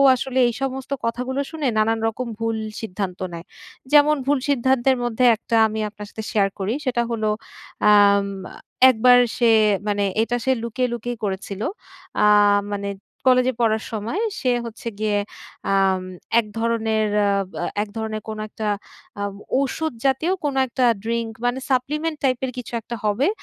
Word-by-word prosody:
আসলে 260 +1 -2
এই 240 - -1
সমস্ত 265 0 -3
কথাগুলো 250 +4 -2
শুনে 310 -4 -2
নানান 225 +1 +2
রকম 235 +2 -3
ভুল 225 0 -1 0.2
সিদ্ধান্ত 190 -3 -4
নেয়। 170 +1 -7 0.5
যেমন 300 +1 +6
ভুল 285 0 +2
সিদ্ধান্তের 260 0 +2
মধ্যে 240 +1 +1
একটা 230 +1 -3
আমি 220 0 -4
আপনার 210 0 -10
সাথে 220 - -7
শেয়ার 200 -2 +2
করি। 195 +4 -1
সেটা 245 -2 +1
হলো 215 -2 0 0.6
আম 200 -1 +6 0.6
একবার 245 +1 +6 0.2
সে 235 -2 +4 0.4
মানে 205 -1 +1 0.2
এইটা 240 +2 0
সে 265 - +3
লুকিয়ে, 250 +2 -1
লুকিয়ে 240 0 -4
করেছিল। 195 0 -4 0.6
আ - - +6 0.5
মানে 200 0 -3 0.4
কলেজে 255 0 +4
পড়ার 220 -1 +2
সময় 225 - -3 0.2
সে 255 - +1
হচ্ছে 230 0 -8
গিয়ে 210 -1 +1 0.5
আ - - +3 0.7
এক 225 - -1
ধরনের 225 -1 +1 0.8
এক - - -9
ধরনের 220 -1 -3
কোনো 215 0 -5
একটা 215 0 -4 0.5
আ - - -3 0.4
ঔষুধ 315 +2 -2
জাতীয় 270 +7 +2
কোন 285 -2 -1
একটা 250 +1 0 0.2
ড্রিংক 230 0 -2
মানে 245 +2 +1
সাপ্লিমেন্ট 300 +5 0
টাইপ 255 -2 +2
এর 255 - -4
কিছু 245 -1 -7
একটা 235 - -6
হবে, 215 - +2
230 Hz, 150 wpm, -22 LUFS, 215-260 Hz, 0.8 s, যেমন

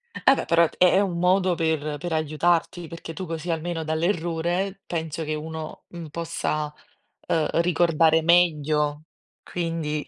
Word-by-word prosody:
Eh 270 - +4
beh, - - -3
però 170 0 +4
è - - -3
è 180 +1 +5
un 190 -4 0
modo 180 0 +3
per 155 -2 -1
per 170 +3 -4
aiutarti, 165 +2 0
perché 165 0 -8
tu 185 - -5
così 165 +1 -5
almeno 165 0 -2
dall'errore 175 +3 -1
penso 160 -1 -3
che 155 - -2
uno, 155 +1 -6
mhmm, 170 -3 -9
possa, 155 -2 -2 0.6
uhm, 155 -2 +2
ricordare 165 -2 +3
meglio 155 -3 +2 0.4
quindi. 165 -3 -3
165 Hz, 145 wpm, -24 LUFS, 155-175 Hz, 0.6 s, è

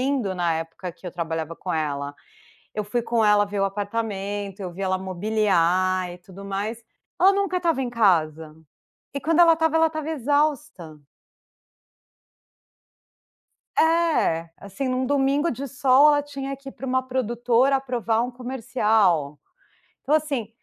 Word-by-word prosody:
lindo 255 -7 0
na 170 -2 0
época 165 +2 -6
que 180 - -27
eu 180 - -4
trabalhava 165 -1 -4
com 180 - -5
ela. 145 -2 -2 0.6
Eu 210 - -1
fui 235 +4 -2
com 235 -1 0
ela 210 -1 +5
ver 200 0 -4
o - - +3
apartamento, 205 -1 -4
eu 180 -2 -5
vi 190 - -10
ela 185 -1 0
mobiliar 185 -2 +1
e 175 - -9
tudo 190 +2 -13
mais. 205 +4 -4 0.4
Ela 385 +2 +7
nunca 395 -2 0
estava 330 -6 0
em 245 - -3
casa, 160 -8 +1 0.6
e 280 - -4
quando 330 +1 +1
ela 335 -1 +8
estava, 320 0 +1
ela 325 0 +4
estava 310 -1 -5
exausta. 285 - -1 2.8
É, 320 - +2
assim 200 +7 -6
em 255 -1 0
um 255 0 -1
domingo 285 +3 +1
de 275 +3 -5
sol 275 +2 +5
ela 290 -1 +3
tinha 275 -1 -6
que 275 0 -12
ir - - -8
para 270 - -8
uma 260 0 +1
produtora 250 +1 +1
aprovar 240 -4 -1
um 250 - -3
comercial. 220 - 0 0.6
Então 285 - -1
assim, 280 -8 -1
225 Hz, 155 wpm, -24 LUFS, 185-275 Hz, 2.8 s, ela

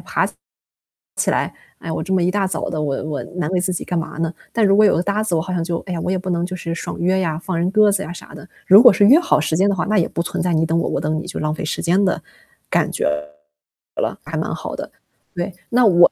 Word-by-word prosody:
起 - - -17 1.8
来： - - -9
“哎， - - -2
我 160 - -2
这 190 - -6
么 185 -2 +3
一 180 - +2
大 200 -1 0
早 - - -3
的 155 - -2
我 140 -2 -2
我 150 -2 -4
难 175 -4 -1
为 180 - +1
自 185 +1 0
己 180 - -4
干 175 - -2
嘛 165 -1 -4
呢？ 165 0 -1 0.2
“但 225 -2 +2
如 195 - +4
果 215 - +6
有 205 - +5
个 170 - 0
搭 205 +2 0
子， 200 -6 -1
我 160 - +1
好 185 +2 -5
像 170 - -1
就 170 0 -2
哎 185 - -4
呀， 170 - -3
我 - - -2
也 190 - +1
不 185 +1 -5
能 170 0 0
就 185 +1 -5
是 165 -1 -4
爽 - - -6
约 185 +2 +2
呀， 160 -4 -1
放 180 0 -3
人 175 +2 +1
鸽 215 -1 +5
子 195 -1 0
呀， 160 - -7
啥 175 - -11
的。 - - -11 0.2
如 200 +4 +8
果 245 - +10
是 205 - +3
约 285 +9 +8
好 350 - +2
时 155 +1 -1
间 195 +4 +3
的 200 - +1
话， 180 - -1
那 215 0 +1
也 165 - +1
不 - - -2
存 - - -3
在 180 -1 0
你 160 0 +2
等 165 +1 0
我、 170 - 0
我 - - -1
等 155 +1 -1
你 - - -7
就 - - -5
浪 155 0 -1
费 - - -5
时 155 - -3
间 180 +4 +3
的 190 - +1 0.5
感 - - +1
觉 - - -3 0.9
了， - - -1
还 - - -6
蛮 - - -2
好 - - -6
的。 - - -7 0.4
对， 175 +2 -3 0.2
那 245 +1 +4
我 175 -4 +6
180 Hz, 315 characters per minute, -20 LUFS, 165-195 Hz, 1.8 s, 果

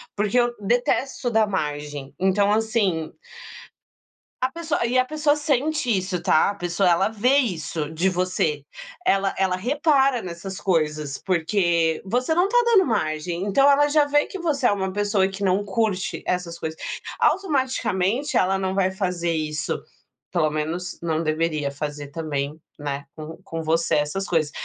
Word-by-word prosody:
porque 210 +3 0
eu 240 0 +2
detesto 245 +4 0
dá 220 -2 +3
margem. 150 -6 -4
Então 195 +2 +3
assim 210 -7 0 1.3
a 255 - +2
pessoa 325 -4 -2
e 245 +2 +1
a 255 - +4
pessoa 300 +1 +1
sente 295 -1 0
isso, 185 -1 -3
tá? 170 +1 +3
A - - -5
pessoa 175 +1 +1
ela 175 +3 +3
vê 230 +5 +2
isso 160 - -1
de 170 +4 +1
você, 180 -5 -1 0.4
ela 195 0 +2
ela 190 -1 +2
repara 275 - +2
nessas 185 +1 -7
coisas, 150 -6 0
porque 170 -2 +1
você 250 +10 0
não 355 +3 +3
tá 485 - 0
dando 430 -5 +5
margem, 170 -4 -1
então 275 +8 +4
ela 290 +1 +5
já 295 0 +4
vê 290 0 +2
que 385 - -7
você 290 -6 +1
é - - +4
uma 190 -2 -2
pessoa 205 -1 +1
que 195 +1 -5
não 190 +2 +2
curte 205 -2 -1
essas 180 -2 -2
coisas, 160 -1 -5 0.4
automaticamente 265 - +1
ela 190 +1 +3
não 190 0 -2
vai 190 -1 +2
fazer 180 -3 -2
isso, 155 -2 -2 0.5
pelo 155 -3 +2
menos 165 +4 -3
não 160 -1 -1
deveria 155 -2 0
fazer 145 0 -5
também, 150 -1 -4 0.2
né, 140 -1 -4
com 155 +1 -8
com 165 0 -5
você 165 +1 +1
essas 150 +7 -1
coisas. 160 -4 +1
190 Hz, 160 wpm, -23 LUFS, 160-240 Hz, 1.3 s, dando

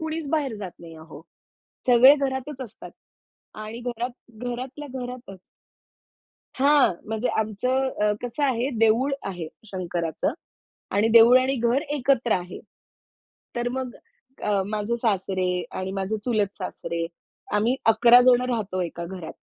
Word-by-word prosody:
कुणीच 315 -1 -4
बाहेर 275 -6 -2
जात 185 - -6
नाही 165 -1 -11
अहो, 155 -2 -12 0.7
सगळे 255 +3 +8
घरातच 265 +1 -5
असतात 235 -5 -9 0.7
आणि 225 +2 -7
घरात 240 -1 -7
घरातल्या 260 +4 -7
घरातच. 245 -6 -8 1.2
हां, 280 -3 +5 0.2
म्हणजे 220 +2 -1
आमचं 250 +5 0 0.2
अ, 210 - +3
कसं 245 +4 -2
आहे, 255 -1 +1
देऊळ 230 +5 +3 0.2
आहे 175 -4 -5 0.2
शंकराचं 175 -5 -2 0.6
आणि 210 +2 +3
देऊळ 230 +2 +8
आणि 260 +1 +1
घर 240 +2 +2 0.2
एकत्र 255 -4 +2
आहे. 180 -1 -3 1.0
तर 240 0 0
मग 255 -2 -4 0.5
अ, 205 -2 +1
माझे 215 +2 -2
सासरे 190 -5 -1
आणि 185 0 -3
माझे 195 +2 -2
चुलत 210 -5 0
सासरे, 170 -3 -4 0.5
आम्ही 220 +4 +2
11 235 +2 +7
जण 250 -1 +6
राहतो 205 -6 -2
एका 170 0 -5
घरात. 180 -3 -7
230 Hz, 130 wpm, -25 LUFS, 195-255 Hz, 1.2 s, सगळे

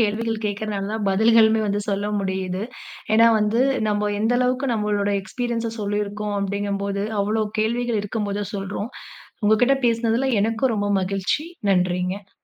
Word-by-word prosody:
கேள்விகள் 225 +1 0
கேக்கறனால 205 -1 -3
தான், 220 -1 -2
பதில்களுமே 220 +2 +5
வந்து 205 0 0
சொல்ல 205 +1 -1
முடியுது. 190 0 -2 0.5
ஏன்னா 230 +1 +7
வந்து, 215 +3 +1 0.3
நம்ம 210 0 0
எந்த 225 +3 +2
அளவுக்கு 255 +2 +1
நம்மளோட 205 -1 0
எக்ஸ்பீரியன்ஸ 235 +1 -3
சொல்லிருக்கோம் 205 0 -2
அப்படிங்கும் 200 0 -2
போது, 200 0 -2 0.2
அவ்ளோ 215 +2 +1 0.2
கேள்விகள் 235 0 0
இருக்கும்போதான் 205 -1 -3
சொல்றோம். 200 +3 -4 0.5
உங்க 215 - +5
கிட்ட 275 +2 +5
பேசினதுல 230 +2 +1 0.2
எனக்கும் 225 +3 +1
ரொம்ப 205 -1 -1
மகிழ்ச்சி. 195 +10 -1 0.3
நன்றிங்க. 180 +1 0
210 Hz, 135 wpm, -23 LUFS, 200-225 Hz, 0.5 s, ஏன்னா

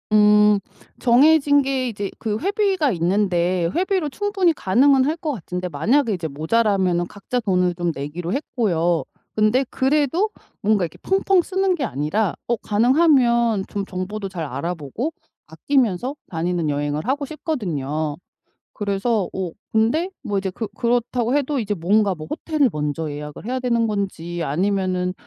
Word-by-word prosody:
음 210 -1 +5 0.4
정해진 285 +3 +5
게 265 -2 -1
이제 205 -4 -4
그 215 -2 -2
회비가 385 -5 +1
있는데 180 -1 +1
회비로 370 -3 0
충분히 390 +2 +1
가능은 260 +4 +3
할 305 +3 0
것 310 - -1
같은데 180 -4 -5
만약에 225 - +2
이제 175 -4 -3
모자라면은 180 +3 +1
각자 205 +6 -4
돈을 180 -5 +1
좀 175 -1 -1
내기로 160 +6 -4
했고요. 175 - 0 0.3
근데 215 +5 +3
그래도 295 +8 +1 0.3
뭔가 205 -2 +3
이렇게 160 - -10
펑펑 385 -1 +3
쓰는 380 0 +1
게 300 - -3
아니라 180 - -1
어 240 - +2
가능하면 235 - +3
좀 200 -1 -4
정보도 195 +2 -4
잘 175 -3 -5
알아 140 +6 -3
보고 175 - -4 0.4
아끼면서 240 - 0 0.2
다니는 170 -1 -1
여행을 145 +5 -2
하고 285 +2 0
싶거든요. 160 - -3 0.6
그래서 205 0 -1
어 185 -3 -3 0.2
근데 235 +12 +2
뭐 205 -5 -1
이제 195 0 -2
그 215 +4 -5
그렇다고 240 +1 0
해도 285 0 -1
이제 210 -3 -1
뭔가 200 +3 +2
뭐 155 -2 -8
호텔을 305 -4 +1
먼저 150 +1 -2
예약을 150 +4 -8
해야 255 +2 -2
되는 235 -2 +1
건지 180 -5 -3
아니면은 185 +3 0
210 Hz, 325 characters per minute, -22 LUFS, 175-265 Hz, 0.6 s, 음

